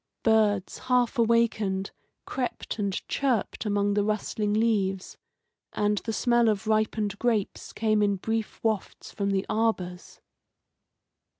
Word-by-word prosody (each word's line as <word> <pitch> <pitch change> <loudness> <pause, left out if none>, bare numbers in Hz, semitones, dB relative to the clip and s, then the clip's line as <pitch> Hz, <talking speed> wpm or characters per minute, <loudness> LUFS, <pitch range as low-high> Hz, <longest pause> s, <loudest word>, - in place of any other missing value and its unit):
Birds, 210 -4 +2
half 250 0 +2
awakened, 220 -4 +1 0.3
crept 250 -3 -4
and 200 -2 -2
chirped 250 -5 -1
among 205 0 +1
the 205 0 +2
rustling 210 0 -1
leaves, 205 -4 0 0.6
and 210 0 +1
the 225 - -4
smell 235 0 +3
of 210 0 -1
ripened 215 -1 0
grapes 225 -5 -1
came 215 -1 +1
in 200 -1 +2
brief 225 +3 -3
wafts 220 -3 -2
from 200 -2 -2
the 195 0 0
arbours. 215 -5 -2
215 Hz, 120 wpm, -27 LUFS, 200-225 Hz, 0.6 s, smell